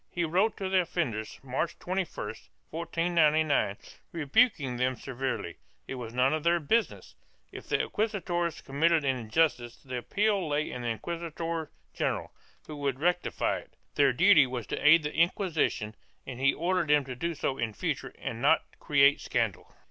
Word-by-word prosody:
He 175 Hz, -, -2 dB
wrote 185 Hz, +7 st, +1 dB
to 195 Hz, -, -3 dB
the 190 Hz, -1 st, +3 dB
offenders, 130 Hz, -12 st, -3 dB
March 135 Hz, +5 st, -2 dB
21, 185 Hz, 0 st, -2 dB, 0.6 s
1499, 160 Hz, -, +1 dB, 0.3 s
rebuking 150 Hz, -, +2 dB
them 130 Hz, +1 st, +1 dB
severely; 130 Hz, -, -4 dB, 0.3 s
it -, -, -5 dB
was 120 Hz, -3 st, -6 dB
none 125 Hz, +4 st, +2 dB
of 155 Hz, -, -1 dB
their 170 Hz, 0 st, +3 dB
business; 220 Hz, +9 st, -1 dB, 0.4 s
if -, -, -10 dB
the -, -, +2 dB
inquisitors 180 Hz, -6 st, -2 dB
committed 155 Hz, +3 st, +1 dB
an 135 Hz, -1 st, +2 dB
injustice 120 Hz, 0 st, 0 dB
the 130 Hz, -2 st, -6 dB
appeal 200 Hz, -, 0 dB
lay 150 Hz, +1 st, -1 dB
to -, -, -6 dB
the 120 Hz, -, -4 dB
inquisitor 165 Hz, +5 st, -4 dB, 0.2 s
general, -, -, -2 dB, 0.3 s
who 150 Hz, -, -8 dB
would 140 Hz, -2 st, -2 dB
rectify 175 Hz, +3 st, 0 dB
it; -, -, -18 dB, 0.2 s
their 140 Hz, -2 st, +4 dB
duty 165 Hz, +1 st, +6 dB
was 125 Hz, -3 st, -4 dB
to -, -, -4 dB
aid 155 Hz, +2 st, +7 dB
the 150 Hz, -, -3 dB
Inquisition 165 Hz, -, 0 dB, 0.3 s
and 130 Hz, -2 st, -7 dB
he 135 Hz, +1 st, +4 dB
ordered 175 Hz, 0 st, 0 dB
them 145 Hz, -1 st, +3 dB
to 130 Hz, -1 st, -6 dB
do 170 Hz, +6 st, -3 dB
so 135 Hz, -2 st, -2 dB
in 115 Hz, -2 st, -1 dB
future -, -, -3 dB
and -, -, -5 dB
not -, -, +3 dB
to -, -, -27 dB
create 140 Hz, -1 st, +4 dB
scandal. -, -, -2 dB
150 Hz, 165 wpm, -29 LUFS, 130-170 Hz, 0.6 s, aid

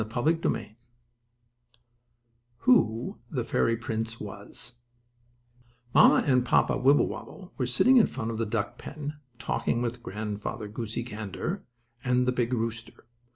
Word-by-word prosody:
STORY 130 Hz, +7 st, +2 dB
VIII 120 Hz, -9 st, -2 dB, 1.8 s
WHO 120 Hz, -, +3 dB
THE 130 Hz, -8 st, -2 dB
FAIRY 115 Hz, 0 st, +1 dB
PRINCE 115 Hz, 0 st, -4 dB
WAS 120 Hz, 0 st, -9 dB, 1.1 s
Mamma -, -, +7 dB
and 130 Hz, -3 st, +4 dB
Papa 125 Hz, -, +3 dB
Wibblewobble 145 Hz, +7 st, +1 dB
were 125 Hz, -, +1 dB
sitting 250 Hz, -, +5 dB
in 230 Hz, -, +6 dB
front 110 Hz, +1 st, -4 dB
of 115 Hz, -, -4 dB
the 115 Hz, -, 0 dB
duck 105 Hz, -2 st, -2 dB
pen, 150 Hz, 0 st, -6 dB, 0.2 s
talking 120 Hz, -, -1 dB
with 120 Hz, 0 st, -3 dB
Grandfather 105 Hz, +1 st, -4 dB
Goosey 110 Hz, +2 st, -4 dB
Gander 110 Hz, -, -5 dB, 0.4 s
and 125 Hz, 0 st, +2 dB
the 125 Hz, -, +2 dB
big 125 Hz, -1 st, 0 dB
rooster. 115 Hz, -1 st, -3 dB
120 Hz, 125 wpm, -28 LUFS, 110-125 Hz, 1.8 s, Mamma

